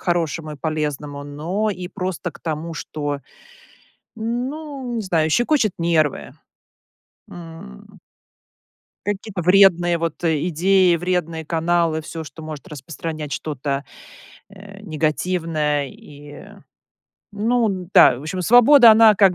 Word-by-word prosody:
хорошему 165 Hz, -3 st, -2 dB
и 150 Hz, -, -9 dB
полезному, 150 Hz, -2 st, -4 dB
но 170 Hz, +9 st, -3 dB
и 180 Hz, -3 st, -4 dB
просто 185 Hz, -2 st, -4 dB
к -, -, -16 dB
тому, 160 Hz, +1 st, -4 dB
что, 145 Hz, -2 st, -4 dB, 1.0 s
ну, 255 Hz, +3 st, -4 dB
не -, -, -1 dB
знаю,- 165 Hz, -5 st, 0 dB
щекочет 240 Hz, -, +2 dB
нервы. 165 Hz, -3 st, 0 dB, 1.0 s
М. 165 Hz, -, -12 dB, 1.1 s
Какие-то 205 Hz, -2 st, -4 dB
вредные 175 Hz, -2 st, +4 dB
вот, 165 Hz, +1 st, -4 dB
э, 160 Hz, +1 st, +1 dB
идеи, 180 Hz, +1 st, +3 dB
вредные 170 Hz, -2 st, -2 dB
каналы- 165 Hz, 0 st, 0 dB
всё, 160 Hz, +1 st, -7 dB
что 150 Hz, +2 st, -11 dB
может 155 Hz, +2 st, -8 dB
распространять 150 Hz, +1 st, -7 dB
что-то, 140 Hz, -1 st, -3 dB, 0.7 s
э, 200 Hz, 0 st, -13 dB
негативное. 155 Hz, -3 st, -1 dB
И, 145 Hz, +2 st, -13 dB, 0.9 s
ну, 225 Hz, +2 st, +1 dB
н-да, 180 Hz, -9 st, +4 dB
в -, -, -11 dB
общем, 180 Hz, +4 st, -4 dB
свобода, 245 Hz, +4 st, +7 dB
она 220 Hz, 0 st, +7 dB
как 195 Hz, -2 st, +4 dB
170 Hz, 115 wpm, -21 LUFS, 155-195 Hz, 1.1 s, свобода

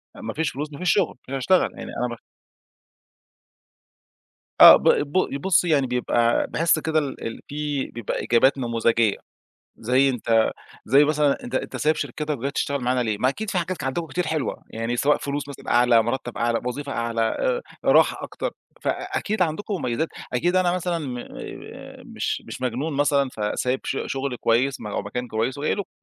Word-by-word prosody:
ما -, -, -6 dB
فيش 160 Hz, -1 st, 0 dB
فلوس، 150 Hz, +3 st, -5 dB
ما 140 Hz, -, -9 dB
فيش 180 Hz, -, +2 dB
شُغل، 195 Hz, -5 st, +1 dB
مش -, -, -5 dB
هاشتغل، 135 Hz, +8 st, +2 dB
يعني -, -, -7 dB, 0.2 s
أنا 120 Hz, -, -5 dB
ب -, -, -19 dB, 2.4 s
آه، -, -, +12 dB
ب -, -, -2 dB
ب 145 Hz, -1 st, +1 dB
بُصّي، 180 Hz, -1 st, +3 dB
يعني 140 Hz, -4 st, +3 dB
بيبقى 120 Hz, -1 st, +1 dB
باحس 165 Hz, -1 st, +2 dB
كده 160 Hz, 0 st, +1 dB
ال 145 Hz, -3 st, -5 dB
ال 115 Hz, -, -7 dB
فيه 145 Hz, -2 st, -3 dB
بيبقى 120 Hz, -3 st, -4 dB
إجابات 130 Hz, +4 st, +4 dB
نموذجية. 115 Hz, -3 st, +1 dB, 0.6 s
زي 130 Hz, +4 st, +3 dB
أنت 115 Hz, -2 st, +2 dB, 0.3 s
زي 140 Hz, +5 st, +5 dB
مثلًا: 150 Hz, -, +1 dB
"أنت 245 Hz, -, -5 dB
أنت -, -, -3 dB
سايب 155 Hz, +1 st, +2 dB
شركتك 150 Hz, +2 st, -3 dB
وجاي 140 Hz, +4 st, -3 dB
تشتغل 140 Hz, -2 st, -1 dB
معانا 125 Hz, 0 st, +1 dB
ليه؟" 110 Hz, -3 st, -1 dB
ما 130 Hz, -, +2 dB
أكيد 215 Hz, +9 st, -4 dB
فيه 185 Hz, -, 0 dB
حاجات 180 Hz, +1 st, -3 dB
ك -, -, -7 dB
عندكم 155 Hz, +5 st, -2 dB
كتير 180 Hz, +1 st, -2 dB
حلوة، 155 Hz, -3 st, -2 dB
يعني 115 Hz, +2 st, -3 dB
سواء 145 Hz, +4 st, +3 dB
فلوس 145 Hz, 0 st, -4 dB
مثلًا 140 Hz, -, -8 dB
أعلى، 120 Hz, -1 st, +5 dB
مُرتَّب 120 Hz, +1 st, -3 dB
أعلى، 115 Hz, 0 st, 0 dB
وظيفة 140 Hz, +3 st, -4 dB
أعلى، 115 Hz, -2 st, -1 dB
آآ، -, -, 0 dB, 0.2 s
راحة -, -, +5 dB
أكتر. -, -, -4 dB, 0.3 s
فأكيد 215 Hz, -1 st, -2 dB
عندكم 180 Hz, +5 st, -1 dB
مميّزات، 140 Hz, 0 st, -1 dB, 0.3 s
أكيد 175 Hz, +9 st, +1 dB
أنا 185 Hz, -1 st, +3 dB
مثلًا 180 Hz, -1 st, -1 dB
م 130 Hz, -5 st, -5 dB
آآ، 120 Hz, -, -9 dB
مش -, -, -3 dB
مش -, -, -8 dB
مجنون 130 Hz, +5 st, -2 dB
مثلًا 140 Hz, -1 st, +2 dB
فسايب 125 Hz, +5 st, -1 dB
ش 135 Hz, -, -2 dB
شُغل 135 Hz, -1 st, -3 dB
كويس 125 Hz, +4 st, +1 dB
م 105 Hz, -, -6 dB
أو 105 Hz, -, -2 dB
مكان 125 Hz, +5 st, -5 dB
كويس 115 Hz, +4 st, -2 dB
وجاي 145 Hz, -, 0 dB
لكم. 200 Hz, -, -5 dB
140 Hz, 180 wpm, -24 LUFS, 120-155 Hz, 2.4 s, آه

